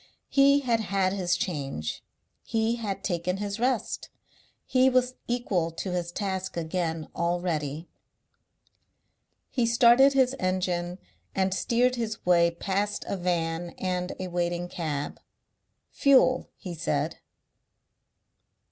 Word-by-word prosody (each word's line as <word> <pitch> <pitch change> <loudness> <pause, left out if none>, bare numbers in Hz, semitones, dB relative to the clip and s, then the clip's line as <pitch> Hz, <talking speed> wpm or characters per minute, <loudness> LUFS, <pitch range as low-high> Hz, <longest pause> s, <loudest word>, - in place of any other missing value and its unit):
He 280 +1 +5
had 235 -4 +1
had 195 -3 0
his 180 -3 0
change; 135 - -3 0.4
he 225 +1 0
had 205 -4 -4
taken 180 0 -1
his 205 +1 -4
rest; 250 -1 -1 0.6
he 260 0 +4
was 255 0 +2
equal 210 -9 0
to 180 +3 -4
his 175 -1 -2
task 190 -1 -3
again 165 -1 -2
already. 170 -3 -1 1.6
He 245 -3 +1
started 240 +3 +6
his 260 -1 +3
engine 180 -1 -1 0.4
and 190 -1 +1
steered 245 +5 +2
his 225 -2 -4
way 170 -1 +5
past 195 +4 -2
a - - -1
van 175 -2 -2
and 180 -1 -2
a 185 - -3
waiting 175 0 -1
cab. 150 -5 -4 0.7
"Fuel," 260 -2 +4
he 180 -4 -7
said. 155 -2 -2
185 Hz, 115 wpm, -27 LUFS, 175-230 Hz, 1.6 s, started